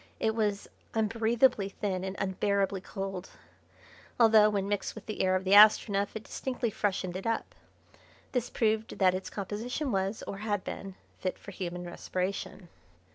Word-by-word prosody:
It 220 Hz, -, +1 dB
was 210 Hz, -2 st, -1 dB, 0.3 s
unbreathably 225 Hz, 0 st, +2 dB
thin 190 Hz, -2 st, -3 dB
and 190 Hz, 0 st, -4 dB
unbearably 195 Hz, 0 st, 0 dB
cold, 195 Hz, -1 st, -5 dB, 0.9 s
although, 220 Hz, -2 st, +7 dB
when 200 Hz, -2 st, -1 dB
mixed 205 Hz, 0 st, -2 dB
with 220 Hz, -, -10 dB
the 215 Hz, -, -3 dB
air 185 Hz, 0 st, +3 dB
of 185 Hz, -, 0 dB
the 190 Hz, +1 st, +2 dB
Astronef, 205 Hz, -1 st, +6 dB
it 220 Hz, -, -5 dB
distinctly 250 Hz, -3 st, -3 dB
freshened 190 Hz, -3 st, -1 dB
it 190 Hz, +4 st, -4 dB
up. 225 Hz, -, -2 dB, 0.8 s
This 245 Hz, -2 st, -1 dB
proved 220 Hz, -1 st, 0 dB
that 185 Hz, -2 st, +4 dB
its 185 Hz, +1 st, -4 dB
composition 230 Hz, +8 st, -3 dB
was, 195 Hz, +1 st, -1 dB
or 195 Hz, -, -6 dB
had 205 Hz, -2 st, -1 dB
been, 195 Hz, -1 st, -6 dB, 0.2 s
fit 185 Hz, -, -2 dB
for -, -, -10 dB
human 180 Hz, -1 st, -5 dB
respiration. 185 Hz, +1 st, -4 dB
200 Hz, 155 wpm, -30 LUFS, 190-220 Hz, 0.9 s, although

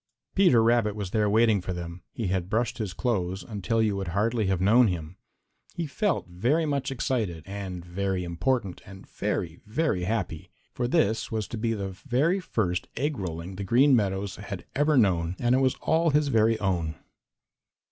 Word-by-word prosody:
Peter 175 Hz, -, +5 dB
Rabbit 115 Hz, -3 st, +3 dB
was 100 Hz, -3 st, -4 dB
there 105 Hz, -2 st, +2 dB
waiting 110 Hz, -1 st, +4 dB
for 90 Hz, -, -4 dB
them. 85 Hz, 0 st, -6 dB
He 115 Hz, -, -4 dB
had 95 Hz, -1 st, -1 dB
brushed 115 Hz, +4 st, 0 dB
his 105 Hz, -4 st, -2 dB
clothes 95 Hz, -3 st, -1 dB
until 110 Hz, +1 st, -1 dB
you 105 Hz, -2 st, +1 dB
would 95 Hz, -2 st, -3 dB
hardly 105 Hz, +4 st, 0 dB
have 95 Hz, -2 st, +1 dB
known 110 Hz, +6 st, +5 dB
him. 85 Hz, -2 st, -4 dB, 0.6 s
He 170 Hz, -, -2 dB
felt 195 Hz, +6 st, 0 dB
very 120 Hz, -, +1 dB
much 140 Hz, -3 st, -1 dB
excited 110 Hz, -, -2 dB
and 95 Hz, -3 st, -6 dB
very 95 Hz, +1 st, -2 dB
important 95 Hz, +3 st, -1 dB
and 95 Hz, 0 st, -12 dB
very, 80 Hz, -1 st, -3 dB
very 110 Hz, -, 0 dB
happy, 105 Hz, -7 st, -3 dB, 0.2 s
for 120 Hz, -, -1 dB
this 120 Hz, -6 st, +1 dB
was 110 Hz, -3 st, -2 dB
to 115 Hz, -, -5 dB
be 115 Hz, 0 st, 0 dB
the 100 Hz, -2 st, -3 dB
very 135 Hz, -, 0 dB
first 100 Hz, -, -1 dB
egg 145 Hz, -2 st, -1 dB
rolling 90 Hz, 0 st, -5 dB
the 100 Hz, -, -3 dB
Green 130 Hz, +8 st, +5 dB
Meadows 100 Hz, -3 st, -1 dB
had -, -, -7 dB
ever 150 Hz, +1 st, +3 dB
known, 90 Hz, -6 st, +2 dB
and 120 Hz, +1 st, +2 dB
it 130 Hz, -, +4 dB
was 130 Hz, -1 st, +2 dB
all 165 Hz, +2 st, +2 dB
his 150 Hz, -1 st, +2 dB
very 115 Hz, -2 st, +3 dB
own. 85 Hz, -6 st, -1 dB
105 Hz, 180 wpm, -27 LUFS, 90-125 Hz, 0.6 s, Peter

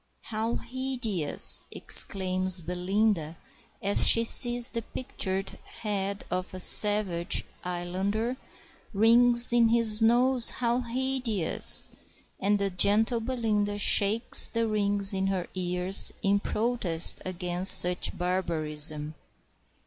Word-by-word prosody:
"How 220 Hz, +2 st, -4 dB
hideous!" 245 Hz, -, +1 dB
exclaims 185 Hz, -1 st, +2 dB
Belinda, 180 Hz, -1 st, -4 dB, 0.5 s
as 200 Hz, +1 st, +3 dB
she 230 Hz, -, +4 dB
sees 240 Hz, +1 st, +3 dB
the 230 Hz, -, -6 dB
pictured 195 Hz, -5 st, -5 dB
head 200 Hz, -2 st, -7 dB
of 185 Hz, 0 st, -6 dB
the 185 Hz, -, -11 dB
savage 195 Hz, -3 st, +1 dB, 0.2 s
islander, 190 Hz, +7 st, -6 dB, 0.6 s
"rings 235 Hz, +3 st, +4 dB
in 235 Hz, -1 st, +1 dB
his 225 Hz, -2 st, +1 dB
nose! 245 Hz, +2 st, +2 dB
how 240 Hz, 0 st, -4 dB
hideous!" 245 Hz, -6 st, +2 dB, 0.5 s
And 205 Hz, +2 st, -2 dB
the 200 Hz, -1 st, -4 dB
gentle 215 Hz, +6 st, 0 dB
Belinda 220 Hz, -4 st, -5 dB
shakes 205 Hz, +3 st, +2 dB
the 230 Hz, -1 st, -4 dB
rings 205 Hz, -1 st, 0 dB
in 190 Hz, 0 st, -4 dB
her 190 Hz, -2 st, -5 dB
ears 180 Hz, +1 st, -1 dB
in 200 Hz, +1 st, -1 dB
protest 210 Hz, -7 st, -2 dB
against 180 Hz, 0 st, +3 dB
such 180 Hz, 0 st, 0 dB
barbarism. 155 Hz, -4 st, -4 dB
200 Hz, 105 wpm, -24 LUFS, 185-230 Hz, 0.6 s, she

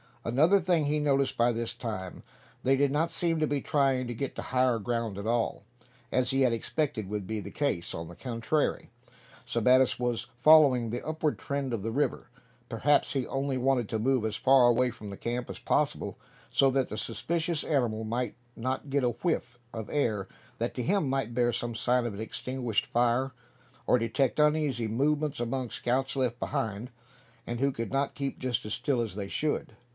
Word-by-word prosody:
Another 155 Hz, +12 st, +4 dB
thing 170 Hz, -3 st, +2 dB
he 150 Hz, +1 st, +1 dB
noticed 140 Hz, -2 st, +2 dB
by 120 Hz, +1 st, +3 dB
this 115 Hz, 0 st, -2 dB
time. 95 Hz, -6 st, -5 dB, 0.4 s
They 135 Hz, +1 st, +4 dB
did 140 Hz, 0 st, +2 dB
not 160 Hz, +3 st, +1 dB
seem 165 Hz, -1 st, +1 dB
to 155 Hz, -, +2 dB
be 145 Hz, -1 st, -1 dB
trying 135 Hz, -3 st, +1 dB
to 120 Hz, -, -3 dB
get 135 Hz, +4 st, -4 dB
to -, -, -4 dB
higher 125 Hz, -2 st, +2 dB
ground 115 Hz, -2 st, -2 dB
at 100 Hz, -, -5 dB
all, 115 Hz, -2 st, 0 dB, 0.5 s
as 125 Hz, -1 st, +1 dB
he 135 Hz, +1 st, +2 dB
had 125 Hz, -3 st, +4 dB
expected 115 Hz, -4 st, -2 dB
would 105 Hz, -2 st, -3 dB
be 110 Hz, +3 st, -3 dB
the -, -, -7 dB
case. 140 Hz, -, -1 dB
On 80 Hz, 0 st, -5 dB
the 85 Hz, -, -11 dB
contrary, 125 Hz, +5 st, -1 dB, 0.6 s
Sebattis 125 Hz, +2 st, +3 dB
was 120 Hz, -1 st, -1 dB
following 135 Hz, -5 st, +6 dB
the 120 Hz, +2 st, -4 dB
upward 155 Hz, -1 st, -1 dB
trend 140 Hz, -3 st, -3 dB
of 115 Hz, -, -2 dB
the 115 Hz, +3 st, -3 dB
river. 140 Hz, 0 st, -1 dB, 0.4 s
Perhaps 130 Hz, +5 st, +2 dB
he 135 Hz, -3 st, 0 dB
only 135 Hz, 0 st, -1 dB
wanted 130 Hz, -3 st, +1 dB
to 110 Hz, -, -1 dB
move 130 Hz, +1 st, +2 dB
as 110 Hz, -1 st, -1 dB
far 130 Hz, 0 st, +5 dB
away 125 Hz, +1 st, +3 dB
from 110 Hz, -3 st, -9 dB
the 100 Hz, -, -7 dB
camp 120 Hz, +1 st, -3 dB
as -, -, -6 dB
possible, -, -, -1 dB, 0.3 s
so 135 Hz, -, +5 dB
that 130 Hz, -1 st, +1 dB
the 105 Hz, -, -5 dB
suspicious 160 Hz, -, -1 dB
animal 120 Hz, -7 st, 0 dB
might 120 Hz, +3 st, -2 dB, 0.2 s
not 130 Hz, +3 st, -3 dB
get 140 Hz, -1 st, +2 dB
a 125 Hz, -, +3 dB
whiff 120 Hz, -2 st, -2 dB, 0.2 s
of 110 Hz, -2 st, -6 dB
air 110 Hz, -9 st, 0 dB, 0.3 s
that, 115 Hz, +1 st, -1 dB
to 125 Hz, -, -2 dB
him, 190 Hz, -4 st, +1 dB
might 135 Hz, -4 st, -1 dB
bear 120 Hz, 0 st, +2 dB
some 120 Hz, 0 st, -2 dB
sign 125 Hz, +1 st, +1 dB
of 105 Hz, -4 st, -4 dB
the 110 Hz, -, -3 dB
extinguished 125 Hz, -1 st, -2 dB
fire; 120 Hz, +3 st, +1 dB, 0.5 s
or -, -, +5 dB
detect 115 Hz, +4 st, 0 dB
uneasy 150 Hz, -6 st, +2 dB
movements 145 Hz, +5 st, 0 dB
among 125 Hz, +2 st, -2 dB
the -, -, -12 dB
scouts 130 Hz, +3 st, 0 dB
left 125 Hz, -3 st, 0 dB
behind, 120 Hz, -4 st, -3 dB, 0.6 s
and 120 Hz, 0 st, -3 dB
who 140 Hz, +1 st, +2 dB
could 115 Hz, -3 st, -5 dB
not 135 Hz, +1 st, 0 dB
keep 140 Hz, -1 st, -3 dB
just 125 Hz, -4 st, -1 dB
as 105 Hz, -, -3 dB
still 125 Hz, 0 st, 0 dB
as 110 Hz, -5 st, -3 dB
they 100 Hz, -1 st, -4 dB
should. 150 Hz, +8 st, -2 dB
125 Hz, 195 wpm, -29 LUFS, 115-140 Hz, 0.6 s, following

